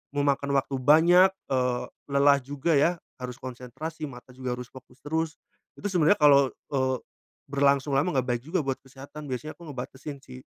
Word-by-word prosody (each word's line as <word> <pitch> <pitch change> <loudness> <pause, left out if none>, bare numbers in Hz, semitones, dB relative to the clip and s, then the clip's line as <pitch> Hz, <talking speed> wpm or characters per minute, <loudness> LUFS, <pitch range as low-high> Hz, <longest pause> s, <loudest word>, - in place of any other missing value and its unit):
memakan 140 -1 +1
waktu 135 - -4
banyak, 170 +7 +6 0.2
eee, 125 -2 +1 0.3
lelah 140 0 +5
juga 145 +4 0
ya. 165 +4 +3 0.2
Harus 125 -1 -6
konsentrasi 130 +6 -7
mata 125 0 -12
juga 130 -1 -3
harus 125 - -7
fokus 130 0 -15
terus, 160 +2 -1 0.4
itu 205 - -2
sebenarnya 180 +2 +4
kalau, 140 -3 +6
eee, 130 -2 -2 0.5
berlangsung 140 0 +2
lama 145 +4 +1
nggak 130 - -3
baik 120 -2 0
juga 165 +5 -1
buat 135 -1 0
kesehatan 135 +3 -11
biasanya 130 +5 -5
aku 170 -2 -12
ngebatesin 135 +2 -7
sih. 65 0 -11
140 Hz, 165 wpm, -27 LUFS, 130-155 Hz, 0.5 s, banyak